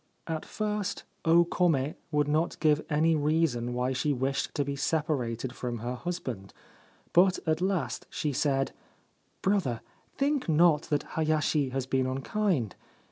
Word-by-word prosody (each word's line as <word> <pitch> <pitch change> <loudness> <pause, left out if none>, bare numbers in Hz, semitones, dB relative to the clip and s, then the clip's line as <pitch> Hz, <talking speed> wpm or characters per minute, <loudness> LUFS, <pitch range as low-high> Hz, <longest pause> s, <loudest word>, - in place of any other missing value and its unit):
At 160 -1 -3
first 210 -2 -2 0.2
O 170 +1 +6
Kome 160 -5 +1 0.2
would 150 -2 +1
not 155 +3 0
give 150 -1 +3
any 160 +1 +3
reason 150 -5 +1
why 125 +1 0
she 145 +3 +1
wished 135 +1 -1
to 145 - +1
be 140 0 -2
separated 135 -5 -1
from 120 -2 -4
her 120 +3 -3
husband; 125 - -5 0.6
but 185 +1 +5
at 160 0 +1
last 185 -6 -1
she 150 -2 -2
said: 135 0 +1 0.7
4 195 - +3
Brother, 130 - 0 0.4
think 280 - +1
not 160 -1 +5
that 145 - +1
Hayashi 155 -3 +1
has 130 0 -2
been 130 0 +1
unkind. 135 - -1
150 Hz, 145 wpm, -29 LUFS, 130-170 Hz, 0.7 s, O